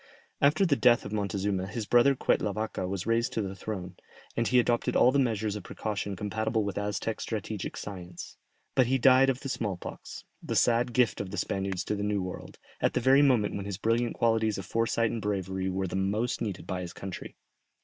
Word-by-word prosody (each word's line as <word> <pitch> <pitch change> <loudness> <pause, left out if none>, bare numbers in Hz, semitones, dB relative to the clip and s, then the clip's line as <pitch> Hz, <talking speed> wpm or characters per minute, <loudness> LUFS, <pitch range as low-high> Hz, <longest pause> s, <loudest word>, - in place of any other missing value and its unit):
After 150 +7 +4
the 155 -6 +3
death 120 -3 +4
of 100 - -6
Montezuma 100 -2 -1
his 105 +2 -4
brother 120 +5 +5
Quetlavaca 105 -5 -1
was 95 -1 -3
raised 115 +1 +1
to 110 - 0
the 95 -1 -4
throne, 95 -2 -6 0.4
and 115 -1 +1
he 125 - +3
adopted 120 -1 +2
all 125 - +6
the 140 - +2
measures 110 -5 0
of 105 - -5
precaution 100 0 -4
compatible 110 +3 -1
with 100 -1 -3
Aztec 105 +2 -2
strategic 110 -2 -4
science. 90 -4 -8 0.4
But 130 -3 +4
he 135 +2 +2
died 130 +1 +6
of 135 -1 -1
the 140 - -5
smallpox, 105 -8 -5 0.2
the - - -4
sad 120 +1 +3
gift 120 -7 +2
of 100 - -5
the 100 - -6
Spaniards 95 0 -2
to - - -2
the 100 - -4
New 105 -2 0
World, 90 - -7 0.2
at - - +2
the - - +3
very 135 +3 +5
moment 125 -7 +3
when 100 -1 -4
his 100 -2 -4
brilliant 115 +3 0
qualities 115 -2 +2
of 95 - -6
foresight 115 +1 +1
and 115 - -3
bravery 95 -2 -2
were 95 +1 -1
the 95 - -4
most 105 +5 0
needed 100 -5 -4
by 90 0 -3
his 90 -1 -6
country. 95 -2 -7
105 Hz, 205 wpm, -29 LUFS, 95-120 Hz, 0.4 s, all